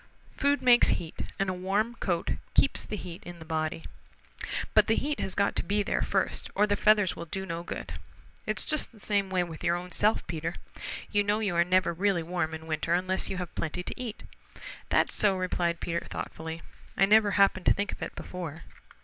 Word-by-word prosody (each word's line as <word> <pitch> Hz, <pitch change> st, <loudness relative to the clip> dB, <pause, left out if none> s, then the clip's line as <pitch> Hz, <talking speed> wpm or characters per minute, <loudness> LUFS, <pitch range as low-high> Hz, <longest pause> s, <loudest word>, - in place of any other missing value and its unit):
"Food 285 Hz, 0 st, +2 dB
makes 245 Hz, -1 st, +7 dB
heat 165 Hz, -2 st, -6 dB
and 195 Hz, -, 0 dB
a 185 Hz, -, 0 dB
warm 195 Hz, +6 st, 0 dB
coat 175 Hz, -7 st, -1 dB, 0.2 s
keeps -, -, +3 dB
the -, -, -5 dB
heat 180 Hz, -4 st, -7 dB
in 175 Hz, -1 st, -9 dB
the 160 Hz, -, -11 dB
body. 160 Hz, 0 st, -2 dB, 0.9 s
But -, -, +5 dB
the 225 Hz, -, +4 dB
heat 295 Hz, +1 st, -1 dB
has 190 Hz, -, -2 dB
got 200 Hz, 0 st, +2 dB
to -, -, +1 dB
be 205 Hz, +3 st, +1 dB
there -, -, 0 dB
first, -, -, -1 dB
or 210 Hz, -, +5 dB
the 205 Hz, -1 st, +1 dB
feathers 210 Hz, -2 st, +4 dB
will 170 Hz, -, -6 dB
do 190 Hz, +3 st, -4 dB
no 170 Hz, -2 st, -4 dB
good. 175 Hz, -, -6 dB, 0.5 s
It's -, -, -1 dB
just 305 Hz, -1 st, +1 dB
the 225 Hz, -, -18 dB
same 200 Hz, -1 st, 0 dB
way 185 Hz, -1 st, +1 dB
with 165 Hz, -2 st, -8 dB
your 170 Hz, -, +3 dB
own 180 Hz, +1 st, -6 dB
self, 215 Hz, +4 st, +2 dB
Peter. 165 Hz, +1 st, -3 dB, 0.6 s
You 205 Hz, -1 st, +3 dB
know 205 Hz, +1 st, +2 dB
you 205 Hz, -5 st, -1 dB
are 170 Hz, -, +5 dB
never 185 Hz, 0 st, +2 dB
really 185 Hz, -1 st, +1 dB
warm 165 Hz, -1 st, -2 dB
in 160 Hz, 0 st, -9 dB
winter 160 Hz, +1 st, 0 dB
unless 185 Hz, +1 st, 0 dB
you 190 Hz, -, -3 dB
have 180 Hz, -2 st, -5 dB
plenty 170 Hz, +2 st, -3 dB
to 250 Hz, -, -6 dB
eat..." 230 Hz, -4 st, -6 dB, 0.7 s
"That's -, -, +3 dB
so," 200 Hz, -3 st, +3 dB
replied 175 Hz, -2 st, 0 dB
Peter 170 Hz, 0 st, -2 dB
thoughtfully. 160 Hz, +1 st, -6 dB, 0.3 s
"I 195 Hz, -, +6 dB
never 210 Hz, +1 st, +5 dB
happened 195 Hz, -2 st, +4 dB
to -, -, +7 dB
think 205 Hz, 0 st, -1 dB
of -, -, -8 dB
it -, -, -5 dB
before. 170 Hz, -3 st, -6 dB
185 Hz, 210 wpm, -29 LUFS, 170-205 Hz, 0.9 s, makes